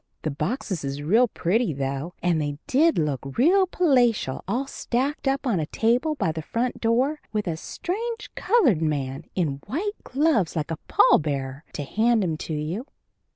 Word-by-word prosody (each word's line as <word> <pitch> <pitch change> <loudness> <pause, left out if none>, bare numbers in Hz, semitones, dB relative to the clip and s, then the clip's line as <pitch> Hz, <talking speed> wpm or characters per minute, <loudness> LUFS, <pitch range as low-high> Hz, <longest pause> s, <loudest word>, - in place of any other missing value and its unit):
The 155 - -1
boxes 180 - -3
is 140 +1 -4
real 225 +11 +4
pretty, 200 -1 0
though, 140 +5 -3
and 170 -3 +2
they 145 -1 -3
did 295 +4 +3
look 135 -3 -2
real 370 +9 +5
palatial 245 - +2
all 240 +8 0
stacked 270 +2 -2
up 275 +1 0
on 225 -9 +1
a 155 - -2
table 245 - +1
by 165 - 0
the 160 0 -5
front 235 +9 -2
door 255 +7 +1
with 210 -1 -1
a 170 -3 -1
strange 430 - -4
colored 345 - +3
man, 145 -1 -2
in 145 -7 -1
white 400 +9 -2
gloves 265 - +1
like 155 -1 -2
a 165 - -2
pall - - +5
bearer, 140 -1 -3
to 145 - -3
hand 220 - +2
'em 165 -4 0
to 160 - -5
you. 165 - -3
205 Hz, 175 wpm, -25 LUFS, -, -, real